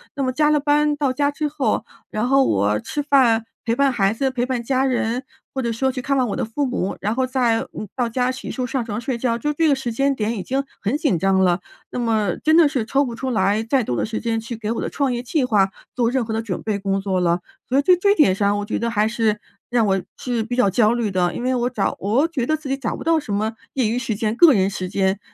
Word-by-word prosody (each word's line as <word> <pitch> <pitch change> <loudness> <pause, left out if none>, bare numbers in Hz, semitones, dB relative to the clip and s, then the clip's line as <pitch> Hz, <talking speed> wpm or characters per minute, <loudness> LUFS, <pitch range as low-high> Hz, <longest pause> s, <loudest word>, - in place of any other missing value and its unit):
那 275 - -1
么 255 - 0
加 300 +2 +3
了 300 -1 +3
班 295 +1 +2
到 280 -3 0
家 285 +2 +1
之 300 +1 -2
后， 270 -7 -1 0.2
然 215 +3 -1
后 270 +1 +4
我 100 - +1
吃 290 - -3
饭 245 -6 +3 0.2
陪， 230 - +1
伴 275 +1 +3
孩 195 -5 +2
子， 265 +4 0
陪 245 -1 -1
伴 255 -2 -2
家 260 +2 +1
人， 250 -1 0 0.3
或 265 - -2
者 235 -2 -1
说 265 +4 0
去 255 0 -5
看 275 +2 0
望 255 -2 +2
我 - - -2
的 - - -2
父 275 +6 -2
母， 245 -7 -2
然 210 +2 0
后 260 - +1
再， 245 -3 +1 0.2
嗯， 210 - -5
到 245 -2 0
家 250 +2 0
洗 260 - -6
漱 255 - -3
上 250 0 -2
床 215 -2 -4
睡 255 -1 -2
觉， 235 -1 0
就 295 +4 -1
这 325 +2 +2
个 285 - +4
时 260 -3 -4
间 275 +4 +1
点 220 0 -2
已 185 - -4
经 270 +2 -1 0.2
很 215 +6 0
紧 290 - +1
张 195 +2 +2
了。 175 0 +2 0.3
那 - - -3
么 220 -6 +1
真 315 +1 +4
的 335 -3 +7
是 260 -6 -1
抽 275 +5 +2
不 235 -2 -5
出 260 +2 -3
来 205 0 +1
再 250 +3 +1
多 125 - -2
的 - - 0
时 220 0 -4
间 230 -1 -1
去 230 +1 -6
给 220 -1 -4
我 230 - -2
的 - - -2
创 275 -2 0
业 240 - -2
计 265 +3 0
划 205 -5 +3 0.3
做 240 -2 +2
任 260 -2 +1
何 220 - -4
的 220 - -1
准 205 -6 -4
备 215 -2 -1
工 195 0 -1
作 190 -2 0
了， 170 0 +2 0.3
所 260 - +1
以 - - +4
在 365 +5 +5
这 400 +1 +4
点 295 - +5
上 200 0 +1
我 205 - -3
觉 210 - -2
得 235 - -1
还 215 -2 +1
是 220 -2 0 0.3
让 240 -2 +2
我 195 -1 +1 0.2
是 240 -3 -2
比 245 +2 -4
较 250 -6 +3
焦 220 +3 +3
虑 235 -3 -1
的， 180 -1 +1
因 - - -4
为 255 0 +1
我 245 0 0
找 220 -5 -1
我 230 - +2
觉 280 -8 -2
得 310 - +1
自 310 -2 -9
己 270 - 0
找 255 -5 -3
不 - - -7
到 330 0 +3
什 250 -9 -5
么 215 +2 -1 0.2
业 255 -5 +1
余 230 - -1
时 235 -3 -2
间， 215 +1 -1
个 315 +3 +7
人 195 -3 +2
时 185 -2 -4
间， 190 0 0
235 Hz, 305 characters per minute, -21 LUFS, 215-270 Hz, 0.3 s, 的